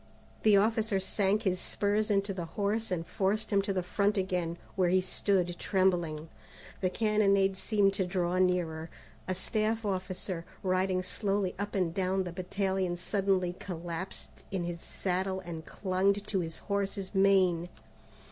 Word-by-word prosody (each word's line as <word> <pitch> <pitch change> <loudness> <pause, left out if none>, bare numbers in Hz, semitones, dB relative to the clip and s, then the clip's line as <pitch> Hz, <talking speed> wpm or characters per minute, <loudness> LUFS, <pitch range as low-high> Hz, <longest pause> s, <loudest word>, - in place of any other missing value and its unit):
The 210 -2 +6
officer 215 -1 +2
sank 195 +2 +1
his 185 -3 +1
spurs 210 +3 0
into 200 -1 +1
the 180 -3 -4
horse 215 +2 0
and 170 -2 -2
forced 210 +3 -1
him 200 - +5
to 200 - -2
the 185 -2 0
front 200 +3 +1
again, 180 -3 -1 0.2
where 185 -2 +3
he 185 +1 +4
stood 185 -1 0
trembling. 175 -5 +1 0.5
The 185 - +1
cannonade 200 -2 +3
seemed 200 0 +2
to 195 -2 0
draw 180 0 0
nearer. 170 -3 +1 0.4
A 185 - -1
staff 215 +3 -1
officer, 185 -2 -3 0.2
riding 185 0 +1
slowly 195 0 -1
up 205 0 -3
and 180 -4 +1
down 190 +1 +1
the 180 - -5
battalion 190 0 -1
suddenly 185 -1 +1
collapsed 175 0 -6
in 190 -3 -2
his 170 -1 -4
saddle 190 0 -2
and 165 -3 -7
clung 190 0 +1
to 200 -1 -2
his 165 -2 -3
horse's 200 -1 -1
mane. 190 -3 +4
190 Hz, 150 wpm, -31 LUFS, 180-200 Hz, 0.5 s, The